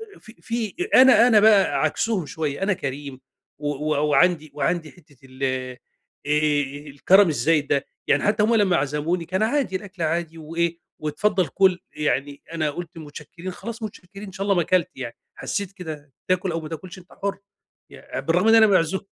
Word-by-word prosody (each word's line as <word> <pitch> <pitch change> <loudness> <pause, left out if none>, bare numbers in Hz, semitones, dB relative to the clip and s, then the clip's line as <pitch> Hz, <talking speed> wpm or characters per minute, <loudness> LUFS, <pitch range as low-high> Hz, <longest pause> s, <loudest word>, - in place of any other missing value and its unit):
أ - - -16
أ - - -20
في 220 - -15
في 230 -3 -3 0.2
أ - - +9
أنا 260 -2 +7
أنا 220 -4 +6
بقى 205 -2 +4
عكسهم 215 -7 0
شوية، 150 +3 -3
أنا 195 0 +2
كريم 140 -3 -6 0.4
و 145 - -4
و 150 +1 -1
وعندي 155 -1 +2
وعندي 160 +2 -1
حتة 150 -6 -22
ال 130 +1 -9
آآ، 130 -1 -2 1.1
الكرم 180 +7 +4
الزايد 150 +2 +1
ده، 140 - 0 0.2
يعني 140 - +2
حتى 210 0 +2
هُم 230 +2 +3
لمّا 200 -5 +3
عزموني 150 +5 -1
كان 190 +5 -1
عادي، 245 -4 0
الأكل 190 -3 -5
عادي 165 0 -2
وإيه، 165 +2 -2 0.2
"واتفضل 185 +4 0
كل." 190 -2 +2
يعني 145 -1 -2
أنا 155 -2 0
قُلت 175 +1 -8
متشكرين، 160 +4 -9
خلاص 225 +5 -8
متشكرين، 200 -1 -9
إن 190 - -9
شا 195 - -4
الله 200 -1 +2
ما 175 - +2
كلت 180 0 +1
يعني، 120 -3 -6 0.2
حسّيت 200 -2 -4
كده 155 -6 -9 0.2
تاكل 185 0 +1
أو 165 - -3
ما 155 - -8
تاكلش 170 +4 -8
أنت 180 - -18
حُر، 200 - -1 0.5
يع - - -7
بالرغم 175 +6 +1
إن 225 - +7
أنا 220 -1 +7
معزو 190 -2 +2
170 Hz, 185 wpm, -23 LUFS, 150-195 Hz, 1.1 s, أ